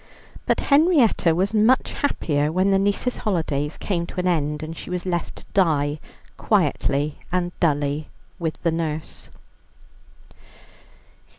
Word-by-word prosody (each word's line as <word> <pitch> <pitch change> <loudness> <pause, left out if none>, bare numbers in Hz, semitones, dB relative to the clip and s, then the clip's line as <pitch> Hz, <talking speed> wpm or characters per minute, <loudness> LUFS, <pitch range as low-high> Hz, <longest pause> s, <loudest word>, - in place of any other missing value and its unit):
But - - +2
Henrietta 280 - +4
was 195 +4 0
much 220 +4 +3
happier 150 - 0
when 185 +4 +2
the 195 - +4
niece's 205 +5 0
holidays 155 -7 -1
came 170 -4 -2
to - - -6
an 180 - -1
end, 150 -3 0
and 160 +1 -6
she - - -9
was 180 0 -3
left 175 -2 -2
to - - -12
die 150 -5 +2 0.4
quietly 145 +2 0
and 175 -1 0
dully 145 -2 0 0.3
with 165 -2 -2
the 170 - +2
nurse. 160 -1 -4
170 Hz, 130 wpm, -23 LUFS, 150-195 Hz, 0.4 s, Henrietta